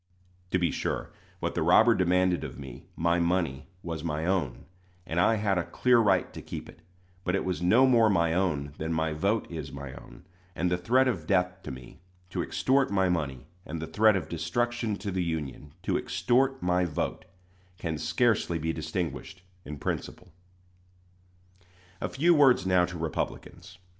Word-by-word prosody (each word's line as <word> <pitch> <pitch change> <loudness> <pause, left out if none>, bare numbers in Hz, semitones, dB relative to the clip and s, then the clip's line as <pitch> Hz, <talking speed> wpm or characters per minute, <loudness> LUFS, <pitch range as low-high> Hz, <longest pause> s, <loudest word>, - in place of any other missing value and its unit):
To 95 - +2
be 85 -3 +1
sure, - - -3 0.3
what - - -1
the - - -1
robber 110 +8 +6
demanded 90 -2 +2
of - - -7
me 65 -3 -10
my 85 +1 +1
money 85 -6 0 0.2
was 80 -3 -5
my 80 -1 -2
own; 85 -10 -1 0.4
and 80 - -2
I 110 +6 +4
had 100 -3 +1
a - - 0
clear 120 +8 +3
right 110 -3 +2
to - - -7
keep - - -7
it; - - -14 0.4
but 90 0 0
it 95 - -1
was 90 -2 -2
no 110 +9 +5
more 115 -4 +5
my 85 -4 +2
own 75 -6 0
than 80 +1 -2
my 80 -1 0
vote 100 +8 0
is 80 -2 -6
my 70 -1 -7
own; 90 - -13 0.3
and 90 +1 0
the 90 - +2
threat 130 +8 +3
of 125 - -2
death 90 -1 +1
to - - -8
me, 65 +5 -11 0.3
to - - -1
extort 135 +1 +1
my 95 -2 +2
money, 75 -7 -2 0.2
and 80 +1 -6
the 80 - -4
threat 105 +6 +4
of 95 - -2
destruction 110 +7 -1
to 100 0 -5
the 90 -1 -1
Union, 75 -4 -4
to - - +1
extort 135 +1 +1
my 90 0 +2
vote, 80 -4 -3 0.5
can 80 -4 -3
scarcely 85 +3 +1
be 80 +1 -2
distinguished 80 +1 -4 0.2
in 75 - -6
principle. 85 +4 -5 1.7
A - - -1
few 170 +6 +3
words 135 - +5
now 90 -1 +4
to 90 0 -7
Republicans. 80 +2 -5
90 Hz, 180 wpm, -28 LUFS, 80-100 Hz, 1.7 s, robber